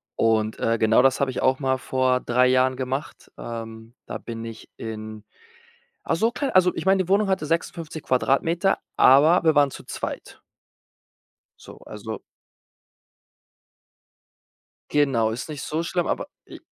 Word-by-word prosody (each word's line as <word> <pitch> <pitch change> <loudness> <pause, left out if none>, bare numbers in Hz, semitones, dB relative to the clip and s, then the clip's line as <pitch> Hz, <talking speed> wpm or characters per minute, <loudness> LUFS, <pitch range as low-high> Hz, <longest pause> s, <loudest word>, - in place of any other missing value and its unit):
Und, 110 -1 +1
äh, 115 0 +1
genau 110 0 +4
das 135 -1 +3
habe 140 - +1
ich - - -4
auch 130 0 +2
mal 130 -2 0
vor 130 0 0
3 125 +1 +2
Jahren 130 0 +2
gemacht. 130 +2 -5
Ähm, 115 0 -8
da - - -5
bin 115 -1 -7
ich 115 -1 -10
in 110 -1 -7 0.8
ach, - - 0
so 225 +7 +1
klein 270 +3 -3
also, 180 -1 +4
ich - - -5
meine, 190 0 +4
die 180 - -12
Wohnung 200 +2 +3
hatte 190 -5 0
56 165 -1 -3
Quadratmeter, 165 +9 +1 0.2
aber 155 +7 +6
wir 160 - +4
waren 145 -1 +4
zu - - -10
zweit. - - -6 1.2
So, - - -13
also 110 +1 -7 2.7
Genau, 135 -7 +2
ist 115 +7 -6
nicht 150 -2 -6
so 155 +2 -2
schlimm, 175 +1 -1
aber - - -2 0.2
i - - -11
130 Hz, 150 wpm, -24 LUFS, 115-165 Hz, 2.7 s, aber